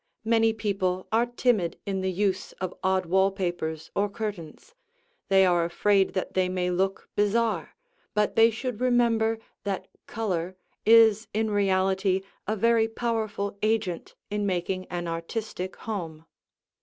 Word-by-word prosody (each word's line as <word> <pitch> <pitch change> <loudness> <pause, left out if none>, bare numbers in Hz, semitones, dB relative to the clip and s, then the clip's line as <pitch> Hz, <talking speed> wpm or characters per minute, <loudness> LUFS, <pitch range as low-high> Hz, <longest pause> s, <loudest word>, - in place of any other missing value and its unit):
Many 225 0 +4
people 195 -4 -1
are 230 +2 +3
timid 240 -8 +1
in 195 -1 -2
the 190 0 0
use 190 0 -1
of 185 -1 -5
odd 190 0 +2
wall 190 +3 +3
papers 175 -5 -4
or 205 +1 +1
curtains; 205 - -6 0.6
they 190 -1 +6
are 175 -2 +3
afraid 195 +3 +2
that 185 - -2
they 185 -1 +1
may 180 -1 -1
look 190 +2 -1
bizarre, 215 +2 0 0.4
but 210 0 +1
they 225 0 +7
should 235 +1 -4
remember 230 -3 +2 0.3
that 200 -2 -3 0.2
color 185 -5 -2 0.3
is 225 -1 +6
in 220 0 +1
reality 190 -1 +2 0.3
a 215 - 0
very 230 +1 +3
powerful 220 -3 -2
agent 215 -5 -1 0.2
in 205 0 -1
making 185 0 -2
an 175 -1 -4
artistic 180 +3 -4
home. 165 -7 -6
200 Hz, 140 wpm, -27 LUFS, 185-220 Hz, 0.6 s, they